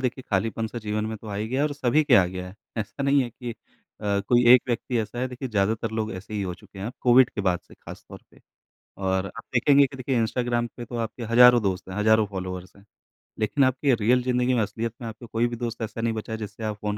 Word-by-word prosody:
देखिए, 130 0 -2
खालीपन-सा 110 +4 -1
जीवन 105 -1 -2
में 110 - -4
तो 110 - -14
आ 105 - -5
ही 105 +2 -2
गया 130 +3 -1
है 150 - +3
और 150 - -4
सभी 145 +1 +2
के 140 -4 +5
आ 95 -6 +7
गया 90 0 -6
है, 90 - -12 0.2
ऐसा 110 +5 -4
नहीं 140 0 +3
है 120 - -5
कि 120 0 -7 0.5
अ, 100 -1 0
कोई 120 0 +4
एक 125 - +7
व्यक्ति 120 +1 -1
ऐसा 110 +2 -4
है, 130 - 0
देखिए, 130 +1 -6
ज़्यादातर 110 +1 0
लोग 110 -1 -2
ऐसे 95 +3 -8
ही 105 - -1
हो 90 -2 -3
चुके 95 +2 -16
हैं 95 - -4
अब, 120 - -5
कोविड 125 0 +6
के - - -4
बाद 90 -3 +1
से - - -15
खासतौर - - -12
पे। - - -21 0.6
और 95 -1 0
आप 115 - -10
देखेंगे 140 +3 +5
कि 135 - -11
देखिए, 130 0 -1
इंस्टाग्राम 120 +1 0
पे 120 - -6
तो 120 - -8
आपके 115 +1 -4
हज़ारों 120 +1 +7
दोस्त 95 -1 -2
हैं, 95 - -6
हज़ारों 110 +1 +4
फ़ॉलोअर्स 95 -1 -6
हैं, 100 - -18 0.6
लेकिन 110 +6 +2
आपकी 130 +1 +2
रियल 120 +3 +2
ज़िंदगी 125 0 +1
में, 120 - +2
असलियत 115 +2 -3
में 115 - -5
आपके 115 +2 -9
कोई 115 +1 0
भी 120 - -5
दोस्त 115 -1 -5
ऐसा 115 +1 -4
नहीं 115 0 0
बचा 110 0 -6
है, 110 - -2
जिससे 105 +1 -7
आप 105 -1 -3
फ़ोन 105 0 -2
115 Hz, 260 wpm, -25 LUFS, 105-125 Hz, 0.6 s, आ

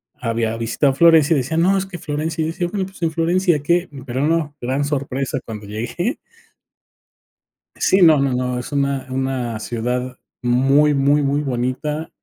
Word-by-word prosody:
había 115 -1 -2
visitado 115 +5 +1
a - - -10
Florencia 165 0 +5
y - - +2
decía: 135 +5 -2
"No, 185 +4 +3
es 190 - -1
que 185 -2 -8
Florencia", 155 +2 -2
decía, 175 +2 -2
bueno, 190 0 -2
pues, 190 -2 -16
en 165 - +1
Florencia, 170 +1 +1
¿qué? 175 +3 +1 0.2
Pero 130 +2 -1
no, 160 -3 0
gran 130 +4 -1
sorpresa 135 -2 -2
cuando 110 -2 -7
llegué. 120 - -3 1.6
Sí, 190 0 +3
no, 160 -4 +7
no, 135 -1 +1
no, 125 0 -1
es 125 - -8
una 140 -2 -1
una 130 -3 -2
ciudad 125 +3 -3 0.3
muy, 135 +5 +3
muy, 140 +2 +3
muy 140 +1 +1
bonita. 135 +4 -2
140 Hz, 165 wpm, -20 LUFS, 125-165 Hz, 1.6 s, no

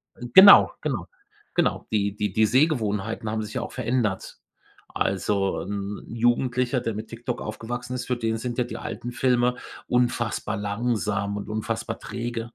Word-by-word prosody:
äh, 120 - -8
genau 190 - +10
genau - - -3 0.5
genau, - - +1
die 100 -2 0
die 105 -2 -2
die 110 +2 +4
Sehgewohnheiten 110 -6 +1
haben 110 0 -1
sich 105 - -8
ja - - -1
auch - - -6
verändert. 115 -6 -2 0.5
Also, 95 0 0
'n 100 +1 -5
Jugendlicher, 120 +2 +1
der 115 -2 -2
mit 110 +1 -6
TikTok 120 +1 -5
aufgewachsen 120 +3 -5
ist, 125 -1 -4
für 125 - 0
den 115 -1 -1
sind 120 +1 -4
ja 125 - +2
die 120 - -7
alten 120 - -6
Filme 125 0 +2 0.3
unfassbar 120 -3 0
langsam 105 -1 -1
und 100 - -6
unfassbar 110 0 -3
träge. 120 -1 -4
115 Hz, 160 wpm, -25 LUFS, 105-120 Hz, 0.5 s, genau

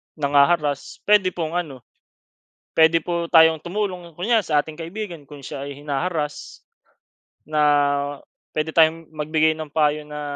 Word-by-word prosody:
nangha-harass. 145 0 +1
Pwede 200 -3 +3
pong 165 0 -2
ano, 140 -7 -7 1.0
pwede 160 +1 +5
po 170 +1 -2
tayong 160 -1 +6
tumulong, 180 -2 -4
kunyari 215 +7 +1
sa 150 -2 +2
ating 155 +1 -11
kaibigan 170 -1 -7
kung 145 +1 -12
siya 140 0 -7
ay 140 - -6
hinaharass. 150 +1 -3 0.9
Na 155 -1 0 0.9
pwede 155 +1 -1
tayong 160 0 +3
magbigay 155 +1 +1
ng 155 -2 -8
payo 150 -1 +1
na, 150 0 -8
160 Hz, 135 wpm, -22 LUFS, 150-175 Hz, 1.0 s, tayong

